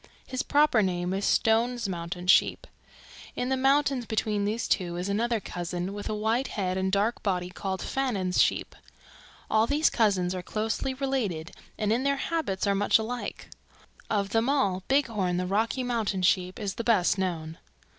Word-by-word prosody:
His 255 0 -3
proper 290 -6 +3
name 180 -1 -1
is 195 +1 -1
Stone's 235 +1 +2
Mountain 175 0 -5
Sheep. 180 - +4 0.7
In 250 - -2
the 265 - +2
mountains 270 -2 +2
between 210 -2 0
these 220 +3 -1
two 175 -2 0
is 180 +2 -3
another 225 +3 0
cousin 175 0 -4
with 205 0 -5
a 215 - -1
white 225 +5 0
head 185 -3 -2
and 190 0 0
dark 205 +4 +1
body 180 -3 -1
called 190 0 -4
Fannin's 205 -10 0
sheep. - - 0 0.7
All 220 +1 +3
these 295 +4 +2
cousins 190 -6 +2
are 185 - -4
closely 220 +7 -2
related 230 - -2 0.3
and 215 0 +1
in 240 - +1
their 280 +1 +1
habits 290 -14 -2
are 200 - +2
much 205 +1 +3
alike. 235 +2 -5 0.6
Of 200 -2 0
them 225 +4 +1
all, 200 -10 +1
Bighorn 220 -10 +1
the 180 - -1
Rocky 220 +7 0
Mountain 220 -6 -1
Sheep 185 0 +1
is 200 -3 -3
the 230 - -4
best 205 -5 +3
known." 165 -4 -3
210 Hz, 170 wpm, -27 LUFS, 185-240 Hz, 0.7 s, Sheep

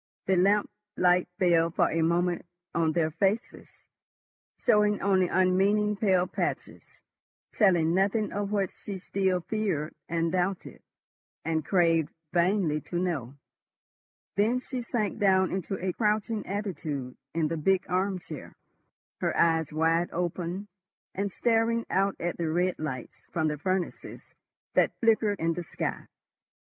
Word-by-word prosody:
The 190 - +2
lamp 200 +3 +3 0.3
light 180 0 +4
fell 170 -2 +3
for 165 - +1
a 165 - +1
moment 175 +2 +1 0.3
on 160 -2 +1
their 160 -1 +1
faces, 200 +7 -1 0.9
showing 210 -3 +3
only 190 -2 +3
unmeaning 195 +4 +2
pale 190 -3 +2
patches, - - -4 0.5
telling 175 -6 +3
nothing 205 +3 +1
of 205 0 -2
what 200 -3 0
she 200 -2 -7
still 190 -1 0
feared, 180 -7 -2 0.2
and 165 0 0
doubted, 185 +1 -2 0.6
and 160 -1 0
craved 165 -2 +2 0.2
vainly 175 -3 +2
to 175 - -5
know. 155 -8 -2 1.0
Then 225 +5 +2
she 255 0 -5
sank 225 -3 -2
down 190 -2 +3
into 190 +1 -3
a 185 0 -2
crouching 215 +1 0
attitude 155 -10 -4 0.2
in 160 -2 +1
the 165 - -1
big 185 +4 +2
arm 185 +1 0
chair, 160 -5 -9 0.6
her - - -1
eyes 160 -2 +3
wide 165 +2 +2
open 180 +3 -3 0.5
and 200 +1 -2
staring 230 +1 +1
out 195 +1 +2
at 175 +1 -2
the 165 -2 0
red 180 +3 0
lights 130 -6 -6
from 160 -2 0
the 150 - -3
furnaces 185 +2 -3 0.4
that - - +2
flickered 220 -3 +2
in 165 +1 +1
the 175 - -4
sky. 170 - -4
185 Hz, 135 wpm, -28 LUFS, 165-200 Hz, 1.0 s, light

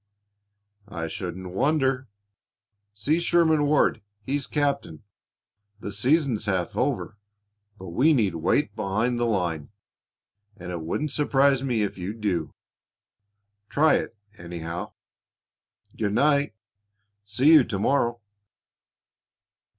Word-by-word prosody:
"I 85 -5 -4
shouldn't 90 0 -6
wonder. 135 +2 +1 0.8
See 140 +11 0
Sherman 165 -3 +3
Ward; 150 0 +2 0.2
he's 140 +3 -2
captain. 140 - -2 0.8
The 105 - -6
season's 120 +1 +1
half 95 -3 -1
over, 125 -5 -2 0.6
but 95 -3 -9
we 130 - +3
need 110 - +2
weight 100 - 0
behind 110 +4 -1
the 120 - +1
line, 85 -8 -1 0.9
and 90 -2 -7
it 85 -2 -4
wouldn't 145 - -2
surprise 140 -2 +2
me 120 -5 0
if 100 - -4
you'd 100 +5 -5
do. 90 -7 -2 1.1
Try 155 +2 +4
it, 115 - -6 0.2
anyhow. 85 0 -6 1.0
Good 105 -2 -1
night; 140 -1 +2 0.7
see 125 +10 +3
you 155 -4 +8
to 100 - -3
morrow." 120 +2 +1
110 Hz, 110 wpm, -25 LUFS, 95-140 Hz, 1.1 s, you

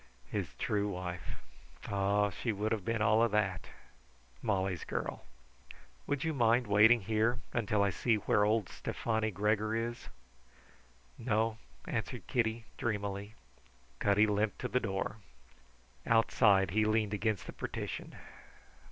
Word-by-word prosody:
His - - -3
true 105 -1 0
wife! 90 -2 -5 0.5
Ah, 100 +1 +1
she 115 +6 -2
would 105 +1 -2
have 110 -4 -1
been 115 +1 0
all 110 +1 +4
of 115 - +4
that 95 -5 0 0.7
Molly's 95 -3 -1
girl! - - -4 0.8
"Will 145 - +1
you 160 +3 -2
mind 120 -2 +3
waiting 110 +3 +6
here 110 +5 +1
until 105 -3 +1
I 100 - +2
see 115 +5 +1
where 105 0 +2
old 105 -2 +2
Stefani 110 +4 -2
Gregor 105 +2 0
is?" 115 +1 -3 1.1
"No," 115 -1 0 0.3
answered - - -4
Kitty, 115 -1 0
dreamily. 100 -2 -3 0.6
Cutty 105 +1 +4
limped 105 0 0
to 125 - -1
the 125 - +1
door. 100 -2 -3 0.9
Outside 100 -4 +4
he 110 +3 +3
leaned 110 -1 +1
against 105 -1 -1
the - - -8
partition. - - -5
105 Hz, 130 wpm, -32 LUFS, 100-115 Hz, 1.1 s, waiting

